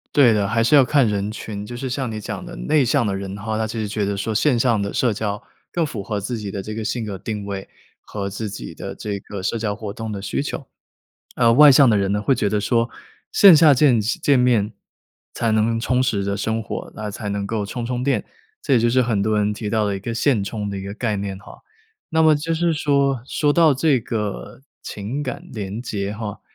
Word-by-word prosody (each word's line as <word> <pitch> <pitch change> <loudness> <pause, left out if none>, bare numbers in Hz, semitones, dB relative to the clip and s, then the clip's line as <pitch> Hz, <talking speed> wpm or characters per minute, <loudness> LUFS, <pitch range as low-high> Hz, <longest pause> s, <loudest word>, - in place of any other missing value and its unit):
对 125 -6 +6
的， 100 -2 +1
还 115 +2 +1
是 135 - +2
要 140 - +8
看 135 -2 +3
人 100 0 -1
群。 105 -2 -6
就 120 +2 -7
是 130 - -4
像 125 -2 -2
你 110 - -4
讲 145 - -6
的 175 0 -9
内 150 -2 +2
向 115 -1 +2
的 100 -2 -1
人 95 0 -5
的 100 - -9
话， 110 0 -2
他 110 0 -1
其 115 +1 -5
实 105 - -2
觉 105 0 -1
得 100 0 -2
说 110 +3 -2
线 125 +3 +2
上 115 -3 +2
的 100 - -2
社 120 -4 +1
交 105 -1 -3 0.3
更 170 -2 0
符 115 -9 -5
合 105 +1 -3
自 115 +4 -4
己 105 -2 -5
的 95 -1 -5
这 110 - -6
个 110 0 -4
性 115 +1 -2
格 100 -2 -5
定 105 +1 -5
位 100 -1 -6 0.3
和 100 -2 -5
自 105 +2 -5
己 60 -11 -7
的 - - -7
这 100 -2 -4
个 100 -1 -8
社 115 - -1
交 105 -2 -2
活 105 -2 -6
动 110 -1 -5
的 100 -1 -5
需 95 +7 -2
求。 140 -1 -5 0.7
呃， 115 -1 +4
外 145 +2 +8
向 135 0 +6
的 105 - +3
人 100 0 0
呢 105 0 0
会 135 - +2
觉 100 - 0
得 105 0 0
说 115 +2 +1 0.4
线 195 -5 +8
下 155 -2 +7
见 130 -4 +4
见 130 +5 +1
面 115 -4 +2 0.6
才 115 -1 0
能 115 +1 +2
充 125 +2 +1
实 105 -6 0
着 100 0 -1
生 110 +2 -1
活， - - -6
那 105 -1 -5
才 105 0 -5
能 100 0 -2
够 105 0 -2
充 120 +3 -5
充 125 0 -2
电， 130 -6 +1 0.4
这 135 - +1
也 120 - +5
就 120 +1 +2
是 130 +2 +3
很 110 -4 0
多 110 +1 +1
人 105 0 +1
提 105 0 -5
到 110 -1 +1
的 100 -1 -1
一 - - -5
个 115 +4 -4
现 115 -4 +2
充 105 0 -4
的 100 - -4
一 - - -5
个 100 +1 -6
概 110 -4 -1
念 100 -1 -4
哈。 100 - -14 0.5
那 160 -1 +2
么 155 -1 +6
就 160 +3 -2
是 170 0 +1
说， 140 -4 +1
说 145 +1 +1
到 165 -2 +5
这 135 -1 +2
个 105 +2 -5 0.2
情 115 +9 -4
感 130 - -6
联 105 0 -5
结 100 -4 -3
哈， 105 -2 -6
110 Hz, 270 characters per minute, -21 LUFS, 100-125 Hz, 0.7 s, 要